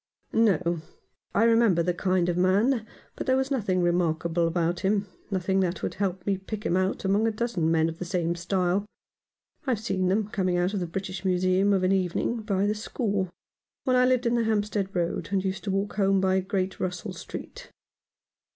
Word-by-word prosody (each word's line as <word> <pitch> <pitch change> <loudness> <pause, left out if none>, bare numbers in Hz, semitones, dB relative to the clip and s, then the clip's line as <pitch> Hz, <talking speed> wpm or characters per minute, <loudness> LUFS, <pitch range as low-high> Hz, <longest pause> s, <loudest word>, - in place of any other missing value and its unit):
" - - -39
No. 175 -4 +1 0.5
I 205 - +4
remember 225 -7 +4
the 180 +1 +1
kind 185 -1 +1
of 175 - 0
man 210 +6 +2
— - - -31
but - - -5
there 260 0 +4
was 265 +1 -1
nothing 195 -9 +1
remarkable 170 -1 +1
about 170 +1 0
him 200 +1 +1
— - - -33
nothing 190 -1 0
that 180 -1 -1
would - - -1
help 190 -2 -2
me 200 -1 +1
to - - -27
pick 215 +2 -6
him 175 - +1
out 185 +1 0
among 205 +3 +3
a - - +2
dozen 215 -7 -1
men 160 -1 +3
of 165 0 -6
the 180 - -4
same 170 -1 0
style. 180 +3 0 0.8
I've 245 -5 +1
seen 190 -5 -1
them 200 +3 +1
coming 185 -4 0
out 180 +3 +1
of 200 - 0
the 175 - -2
British 185 +1 -5
Museum 185 +1 +2
of 190 -2 +2
an 185 - +3
evening 190 +5 0
by 200 -3 0
the 210 - +2
score, 205 -3 -2 0.5
when 255 - +2
I 250 0 +5
lived 255 -1 +2
in 235 - +2
the 235 -1 +2
Hampstead 210 -2 0
Road 170 -1 -1
and 195 -1 0
used 190 0 -2
to - - -2
walk 195 +2 -2
home 195 -1 +3
by 190 0 +2
Great 190 0 -2
Russell 180 -1 -3
Street." - - -9
190 Hz, 210 wpm, -27 LUFS, 180-210 Hz, 0.8 s, I